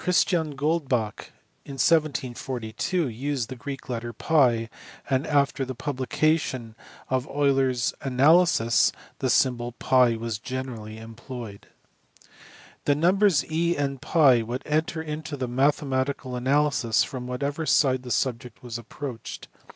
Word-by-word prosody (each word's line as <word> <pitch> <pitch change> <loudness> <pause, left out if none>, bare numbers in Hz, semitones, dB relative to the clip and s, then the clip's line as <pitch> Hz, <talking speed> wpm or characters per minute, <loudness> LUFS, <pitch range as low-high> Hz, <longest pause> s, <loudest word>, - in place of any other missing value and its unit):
Goldbach 150 - 0 0.4
in 140 - -9
1742 135 0 0
used 130 0 -3
TT; 125 -1 -6 0.8
and 135 +2 0
after 140 -2 +2
the 130 0 -5
publication 135 -3 -1 0.3
of 130 -1 -1
Euler 140 -2 +2
s 125 -2 -1
Analysis 140 -1 +4 0.3
the 130 - 0
symbol 120 -1 +2
TT 125 -3 +3
was 115 -2 -3
generally 120 -4 -6
employed. 115 -1 -9 1.2
The 145 - +3
numbers 180 0 +3
e 170 +2 +1
and 140 -2 -2
TT 140 -7 +4
would 125 +4 -4
enter 160 +1 -1
into 150 -1 -5
mathematical 135 0 0
analysis 135 -2 +2
from 125 -2 -6
whatever 140 +5 -3
side 130 -3 +3
the 125 - -9
subject 125 -1 -2
was 120 -1 -5
approached. 120 +1 -7
130 Hz, 110 wpm, -25 LUFS, 120-150 Hz, 1.2 s, Analysis